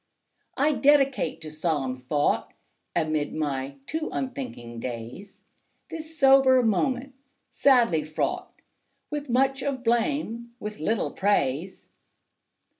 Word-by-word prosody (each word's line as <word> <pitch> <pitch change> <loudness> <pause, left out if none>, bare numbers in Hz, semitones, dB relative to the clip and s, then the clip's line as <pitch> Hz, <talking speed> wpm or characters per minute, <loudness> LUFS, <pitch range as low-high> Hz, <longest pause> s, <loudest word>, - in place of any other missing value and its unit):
I 290 +3 +3
dedicate 275 - +3
to 155 -1 -7
solemn 150 -5 -1
thought 135 +3 -1 0.4
Amid 155 -3 0
my 140 -3 -2
too 315 +1 -3
unthinking 250 - -5
days, 120 - -7 0.5
This 320 0 -7
sober 270 -2 +6
moment, 250 +6 0 0.4
sadly 235 - +4
fraught 155 +1 -2 0.6
With 295 -2 -4
much 270 +2 +2
of 265 -2 -3
blame, 235 0 -1
with 210 -2 -6
little 215 +8 0
praise. 185 -3 -1
225 Hz, 105 wpm, -26 LUFS, -, 0.6 s, sober